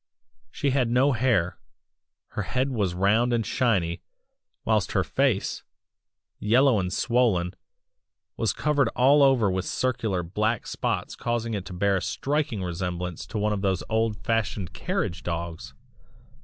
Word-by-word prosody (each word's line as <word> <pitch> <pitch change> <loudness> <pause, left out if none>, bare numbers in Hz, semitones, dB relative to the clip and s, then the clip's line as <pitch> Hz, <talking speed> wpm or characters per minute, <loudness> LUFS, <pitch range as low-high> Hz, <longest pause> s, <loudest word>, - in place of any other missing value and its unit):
"She 140 - -1
had 130 -3 +1
no 130 +4 +3
hair; 115 -8 +1 0.7
her - - -3
head 130 +7 -1
was 100 -8 -1
round 105 +6 +3
and 115 -2 +1
shiny, 90 -9 0 0.6
whilst 105 -3 +1
her 95 - +2
face, 130 -5 0 0.8
yellow 125 +2 +4
and 90 -1 -2
swollen, 110 -9 +1 0.8
was - - +1
covered 145 -2 +1
all 140 +4 +5
over 130 -8 +4
with 95 0 -2
circular 110 -8 -1
black 105 +6 -1
spots - - -2
causing 115 -1 -2
it 100 -3 -3
to 95 - -8
bear 100 +2 +2
a - - -2
striking 140 -8 -1
resemblance 90 -1 -4
to 110 - -5
one 105 0 +1
of 100 - -2
those 95 -3 0
old 110 -1 +1
fashioned 105 -5 -2
carriage 90 +3 -2
dogs!!! 85 -1 -5
105 Hz, 140 wpm, -26 LUFS, 95-125 Hz, 0.8 s, all